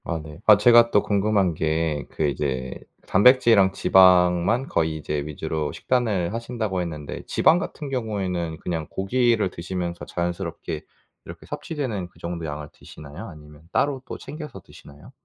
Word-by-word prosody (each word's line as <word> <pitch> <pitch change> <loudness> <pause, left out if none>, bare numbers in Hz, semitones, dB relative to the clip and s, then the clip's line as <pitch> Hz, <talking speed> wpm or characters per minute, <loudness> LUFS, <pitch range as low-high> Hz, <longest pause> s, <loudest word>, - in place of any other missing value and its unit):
아 85 - -3
네. 75 +1 -11
아 105 -1 +9
제가 120 +2 +6
또 105 - +3
궁금한 100 -3 +1
게 80 -1 -1
그 80 - -2
이제 65 -2 -2 0.3
단백질이랑 115 -2 +5
지방만 90 +7 +4
거의 80 -1 0
이제 75 -1 -3
위주로 75 0 -3
식단을 110 -8 -1
하신다고 115 -5 -3
했는데 75 -4 -6
지방 170 - +4
같은 150 -5 -6
경우에는 95 -10 -3
그냥 80 -2 -4
고기를 115 0 +1
드시면서 85 0 -5
자연스럽게 85 0 -4 0.4
이렇게 - - -11
섭취되는 125 - -4
그 90 - -26
정도의 85 -2 -5
양을 75 0 -6
드시나요? 75 +9 -11
아니면 75 -2 -14
따로 140 -2 0
또 - - -6
챙겨서 150 - -9
드시나요? 70 -2 -16
90 Hz, 355 characters per minute, -24 LUFS, 80-110 Hz, 0.4 s, 아